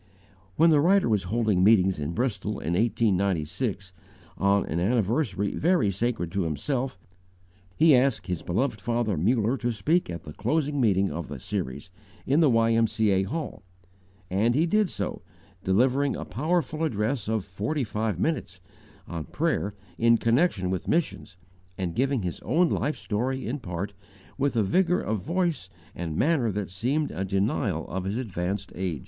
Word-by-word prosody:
When 165 +1 +5
the 150 -2 +5
writer 190 +2 +4
was 105 -5 +1
holding 105 -2 +1
meetings 95 -4 +4
in 75 +3 -3
Bristol 105 -2 -1
in 85 -4 -3
1896, 100 - 0 0.4
on 100 0 +2
an 80 - -2
anniversary 105 - 0
very 160 - +2
sacred 100 -4 -2
to 100 - -1
himself, 120 - -2 0.8
he 155 -2 +6
asked 125 -2 +2
his 90 -4 -3
beloved 110 +4 -1
father 115 -3 0
Muller 110 - +1
to 120 -1 -1
speak 155 - +1
at 85 -1 -6
the 75 - -9
closing 145 - 0
meeting 100 -4 +2
of 80 +1 -5
the 70 -2 -7
series, 70 +8 -4 0.3
in 140 +4 +3
the 155 -4 +5
Y.M.C.A. 115 -3 +3
Hall; 155 +4 -4 0.7
and 105 +7 +1
he 155 +4 +3
did 210 +2 +2
so, - - -4 0.4
delivering 130 +8 +2
a - - -5
powerful 160 +2 -1
address 110 -4 -1
of 110 -3 -1
forty 110 +10 -2
five 105 -4 -2
minutes, 95 - -2 0.5
on 85 -3 -5
Prayer 150 - -1 0.2
in 115 0 +5
connection 115 - +1
with 95 -2 -3
Missions, 130 - -1 0.4
and 90 -3 -2
giving 130 -1 0
his 90 - -4
own 170 +1 +2
life 150 - -1
story 125 +5 -2
in 130 +6 -3
part, 95 -1 -5 0.5
with 135 -2 +1
a 110 - +3
vigour 180 - +2
of 105 -3 -2
voice 175 - -1 0.2
and 80 -2 -4
manner 140 -8 +2
that 100 -2 -4
seemed 135 +11 -1
a 90 - -3
denial 95 +1 -1
of 95 +1 -4
his 100 +4 -2
advanced 100 -4 -3
age. 90 -5 -3
110 Hz, 160 wpm, -26 LUFS, 95-135 Hz, 0.8 s, he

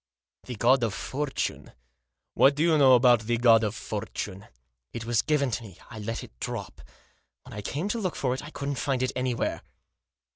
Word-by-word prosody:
" - - -67
The 125 - -5
God 125 +4 +4
of 110 -4 -1
Fortune? 145 0 -3 0.6
What 140 +1 +5
do 150 - +1
you 165 -2 +4
know 130 -2 +7
about 120 -1 +5
the 120 +2 -1
God 115 -1 +5
of 105 0 -1
Fortune?" 105 -2 -5 0.2
" - - -54
It 115 -1 -5
was 120 -1 +2
given 145 -4 +1
to 115 - -2
me. 95 -5 -12
I 110 - -8
let 115 +2 -4
it - - -12
drop. - - -5 0.6
When - - -12
I 105 - -5
came 145 - -3
to 230 - -1
look 185 -5 -2
for 125 -2 0
it 130 - -4
I 150 - -8
couldn't 140 -3 -4
find 135 -3 0
it 130 - 0
anywhere." 125 -1 -1
125 Hz, 210 wpm, -27 LUFS, 110-140 Hz, 0.6 s, know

